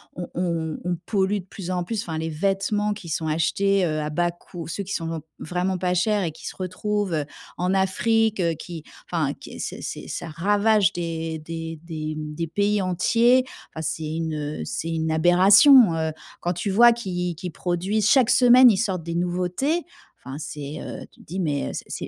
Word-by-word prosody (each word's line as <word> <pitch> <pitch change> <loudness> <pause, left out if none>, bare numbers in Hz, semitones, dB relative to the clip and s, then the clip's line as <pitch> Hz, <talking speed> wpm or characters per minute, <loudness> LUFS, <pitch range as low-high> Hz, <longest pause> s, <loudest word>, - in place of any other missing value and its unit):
on 175 - -5
on 165 -3 -2
on 175 0 -1
pollue 200 -1 +1
de 180 - -11
plus 185 -1 -7
en 180 -1 -1
plus 215 +3 -2
enfin, 160 -7 -5
les 160 - -2
vêtements 195 +5 0
qui 200 -4 -10
sont 160 +1 -2
achetés, 190 +5 +1
heu, 155 -2 -1
à 150 - -3
bas 175 +3 0
coût 175 -1 -10
ceux 200 +4 -4
qui 195 - -5
sont 165 -1 -3 0.2
vraiment 180 +3 -2
pas 180 0 0
chers 205 +2 +1
et 165 - -1
qui 160 - -13
se - - -6
retrouvent, 195 +1 -2
heu, 150 -2 0 0.3
en 180 +2 0
Afrique, 215 +3 +2
heu, 170 -1 +2
qui 165 0 -8 0.3
enfin 155 -5 0
qui - - -11
c'est - - -5
c'est - - -6
ça - - -4
ravage 205 +4 +2
des 165 -2 -3
des 165 0 -6
des, 155 -2 -5
mmh, 150 0 -6
des 165 +1 -2
pays 205 +4 +1
entiers. 235 +8 +3 0.3
Enfin, 160 - -5
c'est 160 0 -3
une, 160 -1 -2
heu, 150 0 -4
c'est 165 - -3
une 160 0 -1
aberration, 190 - +7
heu. 160 -1 -1 0.3
Quand 175 - 0
tu 180 +4 -3
vois 235 +5 +7
qu'ils 180 -7 -3
qu'ils 180 +2 -6
produisent 190 +6 0
chaque 255 -4 +5
semaine 250 0 +7
ils - - +2
sortent 190 -5 -1
des 170 +1 -4
nouveautés, 180 - 0 0.4
enfin 135 +1 -6
c'est, 145 0 -6
heu - - -7
tu - - -25
te - - -18
dis: 185 +3 -5
«Mais, 145 -5 -1
heu, - - -5
c'est - - -5
180 Hz, 205 wpm, -24 LUFS, 160-200 Hz, 0.4 s, aberration